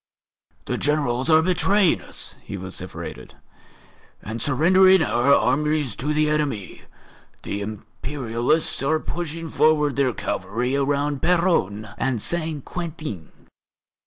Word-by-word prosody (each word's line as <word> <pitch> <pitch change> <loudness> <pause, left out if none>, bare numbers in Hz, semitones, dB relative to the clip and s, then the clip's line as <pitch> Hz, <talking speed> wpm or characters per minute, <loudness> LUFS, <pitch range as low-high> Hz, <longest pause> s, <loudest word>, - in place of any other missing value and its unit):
"The - - -2
Generals 145 -2 +1
are 160 0 +6
betraying 185 +1 +3
us," - - -6
he - - -7
vociferated, - - -8 0.9
"and 110 +1 -5
surrendering 185 +7 +5
our 125 -1 +2
armies 145 -1 +2
to 145 +4 -2
the 155 0 +2
enemy. 145 -10 -2 0.6
The 100 - -4
Imperialists 115 +6 -2
are 155 +3 +1
pushing 165 0 -5
forward 150 -3 +2
their 135 -2 +2
cavalry 120 +8 -2
around 140 0 0
Péronne 160 - +1
and 130 -3 0
Saint 160 +1 -2
Quentin. 155 - -7
145 Hz, 110 wpm, -23 LUFS, 120-160 Hz, 0.9 s, are